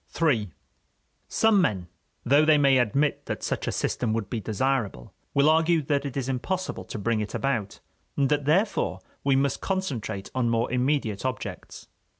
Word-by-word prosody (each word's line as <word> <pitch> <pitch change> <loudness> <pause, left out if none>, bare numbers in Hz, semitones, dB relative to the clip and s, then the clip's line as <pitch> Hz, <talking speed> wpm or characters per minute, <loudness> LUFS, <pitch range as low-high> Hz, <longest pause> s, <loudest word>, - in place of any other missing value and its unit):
III 125 - +2 0.8
Some 220 -3 +3
men, 95 - 0 0.4
though 140 +5 +5
they 155 -1 +5
may 135 -2 +4
admit 135 +6 0
that - - -4
such - - -2
a - - +1
system 115 -3 -1
would 110 -3 -3
be 115 - -1
desirable, 110 - -2 0.2
will 140 +1 +4
argue 160 0 +3
that 140 0 0
it 140 - -6
is 130 -2 -2
impossible 180 +9 -3
to - - -6
bring 110 +2 0
it 105 - -5
about, 115 -8 -2 0.4
and 140 - +3
that 145 -1 +1
therefore 160 - +1 0.2
we 140 -1 +3
must 135 0 +1
concentrate 135 - -3
on 125 -2 +1
more 115 +1 0
immediate 125 -5 0
objects. 130 -4 -5
135 Hz, 165 wpm, -26 LUFS, 115-150 Hz, 0.8 s, though